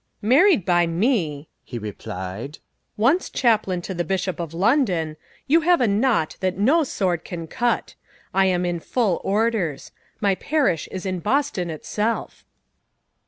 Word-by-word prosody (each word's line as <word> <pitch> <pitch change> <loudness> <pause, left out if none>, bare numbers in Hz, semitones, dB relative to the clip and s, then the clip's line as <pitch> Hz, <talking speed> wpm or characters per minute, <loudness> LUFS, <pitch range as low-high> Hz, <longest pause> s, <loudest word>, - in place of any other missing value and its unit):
"Married 275 - +5
by 175 -2 +3
me," 165 - 0 0.2
he 120 - -7
replied, 105 +3 -6 0.4
"once 270 - +2
chaplain 210 -7 +1
to 190 - -4
the 175 -1 -1
Bishop 190 0 -2
of 170 -3 -4
London, 180 - +1 0.3
you 325 +4 +4
have 350 +2 +4
a 245 - +3
knot 210 -5 +1
that 185 -1 -1
no 280 +11 +4
sword 180 - -1
can 170 -3 -6
cut. 240 +8 -1 0.4
I 190 0 +4
am 180 -1 +1
in 175 -1 -1
full 205 0 0
orders. 205 -7 0 0.3
My 200 -3 +2
parish 195 - 0
is 190 +1 -6
in 185 -1 -2
Boston 210 - 0
itself." 210 +8 -3
190 Hz, 145 wpm, -23 LUFS, 170-235 Hz, 0.4 s, Married